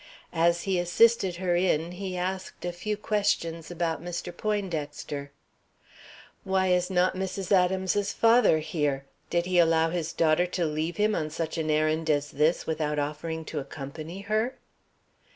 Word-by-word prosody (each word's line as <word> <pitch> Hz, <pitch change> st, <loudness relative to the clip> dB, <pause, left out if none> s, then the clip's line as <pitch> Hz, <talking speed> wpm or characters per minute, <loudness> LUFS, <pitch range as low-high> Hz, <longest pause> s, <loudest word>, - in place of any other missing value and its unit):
As 170 Hz, +1 st, +2 dB
he 190 Hz, -2 st, +1 dB
assisted 190 Hz, +2 st, +3 dB
her 175 Hz, 0 st, 0 dB
in, 175 Hz, -2 st, +1 dB
he 185 Hz, 0 st, -5 dB
asked 185 Hz, 0 st, -4 dB
a 175 Hz, -, -1 dB
few 210 Hz, +5 st, -3 dB
questions 200 Hz, -7 st, -1 dB
about 170 Hz, -2 st, -2 dB
Mr. 175 Hz, 0 st, -5 dB
Poindexter. 155 Hz, -9 st, -3 dB, 1.1 s
"Why 190 Hz, -1 st, +1 dB
is 180 Hz, 0 st, +2 dB
not 180 Hz, 0 st, +2 dB
Mrs. 190 Hz, 0 st, -4 dB
Adams's 190 Hz, +2 st, +2 dB
father 230 Hz, -7 st, +5 dB
here? 150 Hz, -3 st, -1 dB, 0.2 s
Did 170 Hz, 0 st, +1 dB
he 180 Hz, -1 st, +2 dB
allow 165 Hz, -1 st, +4 dB
his 165 Hz, -2 st, -2 dB
daughter 165 Hz, +2 st, +2 dB
to 180 Hz, -1 st, -1 dB
leave 155 Hz, +2 st, -2 dB
him 215 Hz, +1 st, +2 dB
on 155 Hz, -5 st, -1 dB
such 160 Hz, +1 st, -3 dB
an 155 Hz, -1 st, -1 dB
errand 155 Hz, +1 st, +1 dB
as 145 Hz, -1 st, +1 dB
this 155 Hz, +4 st, +1 dB
without 155 Hz, -2 st, -1 dB
offering 155 Hz, +2 st, -3 dB
to 155 Hz, -, -4 dB
accompany 155 Hz, +6 st, -7 dB
her?" 215 Hz, +5 st, -1 dB
175 Hz, 150 wpm, -27 LUFS, 155-190 Hz, 1.1 s, father